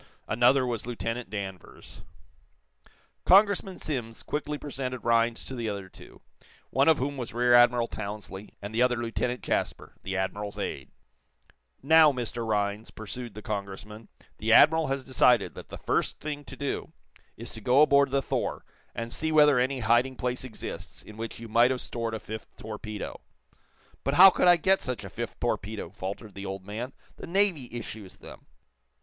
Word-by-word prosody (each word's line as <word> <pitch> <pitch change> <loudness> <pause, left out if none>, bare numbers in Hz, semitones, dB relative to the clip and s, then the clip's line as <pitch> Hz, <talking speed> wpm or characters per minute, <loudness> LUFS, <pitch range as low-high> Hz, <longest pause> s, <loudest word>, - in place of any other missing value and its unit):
Another 120 +4 +4
was 120 -2 -3
Lieutenant 115 -1 -4
Danvers. 95 -3 -8 1.2
Congressman 195 -1 +4
Simms 120 -7 -5
quickly 150 0 -3
presented 130 -4 -5
Rhinds 115 0 +2
to - - -6
the 120 -3 -3
other 100 -2 -5
two, - - -15 0.5
one 135 +1 +3
of 160 -2 +6
whom 140 +2 -2
was 120 -4 -6
Rear 120 0 +3
Admiral 120 -1 +6
Townsley, 105 -2 -7
and 100 +2 -6
the 115 - +1
other 125 -1 +4
Lieutenant 120 +1 -2
Jasper, - - -2
the 95 0 -3
Admiral's 100 +2 -3
aide. 70 - -4 0.9
"Now, 160 +1 +7
Mr. 120 -2 -4
Rhinds," 105 0 -1
pursued 110 +1 -7
the 110 - -9
Congressman, 105 +1 -6 0.3
"the 110 +1 0
admiral 160 +7 +6
has 135 0 -2
decided 125 -4 +3
that - - -11
the - - -7
first - - -1
thing 145 -1 -5
to 135 - -9
do 140 - -4 0.4
is - - -7
to - - -6
go 130 +4 +5
aboard 140 -2 +4
the 135 0 0
'Thor,' - - -2 0.3
and 115 0 -4
see 160 0 -1
whether 150 -4 +6
any 130 +1 0
hiding 120 +4 +2
place 125 0 -2
exists 125 -4 -7
in 105 - -12
which 115 +1 -6
you 115 - -8
might 120 +3 +4
have 130 -1 -1
stored 115 -2 -3
a - - -4
fifth 110 +1 -7
torpedo." 110 -1 -7 0.8
"But 140 +2 0
how 190 +3 +10
could - - +2
I 175 - +8
get 190 +3 +3
such 125 -3 -4
a - - -8
fifth - - -6
torpedo?" - - -3
faltered 100 +2 -6
the 100 +1 -7
old 95 0 -6
man. 115 +6 -5 0.2
"The - - -8
Navy 175 -8 +1
issues 110 -4 -8
them." - - -13
120 Hz, 170 wpm, -28 LUFS, 110-135 Hz, 1.2 s, how